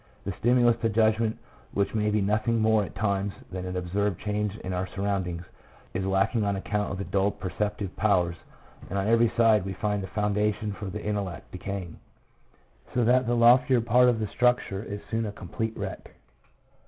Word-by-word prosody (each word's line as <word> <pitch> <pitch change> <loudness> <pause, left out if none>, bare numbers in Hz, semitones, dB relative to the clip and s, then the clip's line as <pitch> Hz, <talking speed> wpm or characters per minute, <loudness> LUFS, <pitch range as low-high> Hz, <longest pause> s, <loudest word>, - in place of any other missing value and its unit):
The 100 - -1
stimulus 120 -1 +4
to 115 - +2
judgment, 110 +1 +2 0.4
which 100 0 0
may 105 -1 +1
be 105 0 +1
nothing 110 +3 +1
more 110 -1 +3
at 95 - -8
times 100 -1 0 0.2
than 90 0 -4
an 90 0 -3
observed 95 +1 -1
change 105 0 -2
in 95 - -4
our 90 +1 -2
surroundings, 95 -3 -2 0.5
is 95 - -2
lack 95 +4 +1
ing 110 - +2
on 100 -1 0
account 105 +1 -2
of 95 - -3
the 100 - -3
dulled 100 +1 0
perceptive 100 +1 -3
powers, 90 -5 +2 0.5
and 100 - -2
on 100 - 0
every 115 0 +4
side 110 -4 +5
we 95 0 -4
find 105 +1 -1
the 95 - -5
foundation 105 +1 0
for 105 - -7
the 105 +2 -5
intellect 100 -6 -3
decaying, 90 -2 -6 1.0
so 125 - +3
that 125 +1 +3
the 120 - +2
loftier 125 +2 +5
part 120 +2 +4
of 115 -2 +1
the 110 - 0
structure 120 -3 +1
is 105 -1 -6
soon 115 -1 0
a - - -4
complete 110 +4 -4
wreck. - - -6
105 Hz, 190 wpm, -27 LUFS, 95-110 Hz, 1.0 s, side